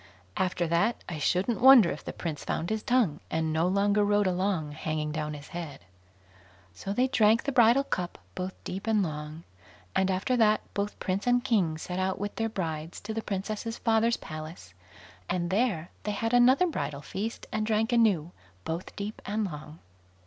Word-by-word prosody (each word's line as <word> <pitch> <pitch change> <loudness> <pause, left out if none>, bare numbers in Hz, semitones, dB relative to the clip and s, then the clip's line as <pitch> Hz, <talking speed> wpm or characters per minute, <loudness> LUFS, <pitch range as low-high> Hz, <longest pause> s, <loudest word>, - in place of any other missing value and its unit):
After 180 -1 0
that, 170 +8 +1
I 165 -3 -5
shouldn't 190 +10 +1
wonder 250 -8 +8
if 150 - -6
the - - -5
Prince 160 -4 -5
found 170 - -2
his 220 0 -1
tongue, 230 -13 +2
and 160 -1 -1
no 160 +2 +2
longer 200 +2 +2
rode 205 0 +3
along 185 -4 0
hanging 155 0 -3
down 150 -1 -3
his 145 0 -11
head. 165 - -7 0.9
So 145 - -6
they 250 +6 +2
drank 225 -3 +4
the 280 - -1
bridal 245 +1 +5
cup 180 -9 -3 0.2
both 185 +1 -4
deep 195 +4 -6
and 215 -2 +3
long, 155 0 -5 0.5
and, 190 0 +2
after 190 +7 0
that, 215 -2 +4
both 205 +1 -2
Prince 195 +5 -2
and 245 0 +3
King 195 -11 +1
set 180 +3 -4
out 190 0 0
with 205 +1 -4
their 225 0 0
brides 165 -5 -4
to 220 +2 -5
the 225 - -2
Princess's 215 +3 -4
father's 230 0 +2
palace, 155 - -9 0.6
and 175 -1 -1
there 195 -6 0
they 210 - -2
had 225 +3 -2
another 255 +8 +6
bridal 145 - -3
feast, 220 +9 -5
and 215 0 -1
drank 225 +2 +1
anew, 200 -9 +3 0.3
both 165 +3 -4
deep 205 +2 -5
and 210 +1 0
long. 155 -3 -8
195 Hz, 180 wpm, -28 LUFS, 160-225 Hz, 0.9 s, wonder